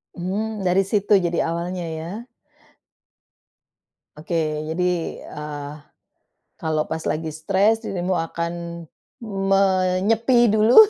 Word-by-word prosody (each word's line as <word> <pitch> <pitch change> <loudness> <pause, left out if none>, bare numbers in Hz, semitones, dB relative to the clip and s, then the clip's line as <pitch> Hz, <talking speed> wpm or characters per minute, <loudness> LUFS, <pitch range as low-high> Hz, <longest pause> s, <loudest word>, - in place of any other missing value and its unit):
Mmm. 205 +4 -2
Dari 190 +1 +3
situ 205 +1 +3
jadi 175 -2 +1
awalnya 175 +1 -3
ya. 170 +10 -6 1.9
Oke, 160 +3 -4 0.3
jadi, 170 +3 -1 0.4
eee, 150 -1 -6 0.9
kalau 155 -1 +1
pas 160 - -2
lagi 160 +1 -1
stres 195 +8 +2
dirimu 185 -3 -1
akan 170 +1 -3 1.0
menyepi 195 +5 +3
dulu, 220 +3 +5
185 Hz, 95 wpm, -23 LUFS, 165-205 Hz, 1.9 s, dulu